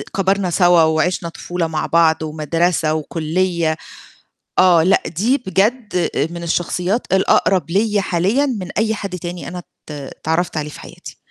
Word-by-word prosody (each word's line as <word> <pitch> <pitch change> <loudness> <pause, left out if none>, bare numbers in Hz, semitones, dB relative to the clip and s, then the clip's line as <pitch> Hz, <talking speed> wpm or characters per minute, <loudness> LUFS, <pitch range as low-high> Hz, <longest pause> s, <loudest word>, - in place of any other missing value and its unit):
كبرنا 195 -1 +1
سوا 175 -1 +4
وعِشنا 165 +2 +1
طفولة 175 0 -3
مع 155 -1 -2
بعض 160 -1 +3
ومدرسة 155 +1 0
وكُليّة 165 +1 -1 0.8
آه، 175 -3 +5
لأ 190 +3 +3
دي 225 - +1
بجد 205 -1 0 0.2
من 170 0 -7
الشخصيات 180 +6 -1
الأقرب 190 -3 +2
ليّا 205 +1 +2
حاليّا 195 +11 +1
من 205 -9 -3
أي 220 0 +1
حد 195 -3 -5
تاني 175 +1 -6
أنا 180 +1 -6
ات - - -14 0.2
اتعرّفت 160 +4 -3
عليه 150 0 -2
في - - -11
حياتي. - - -11
175 Hz, 145 wpm, -19 LUFS, 160-195 Hz, 0.8 s, آه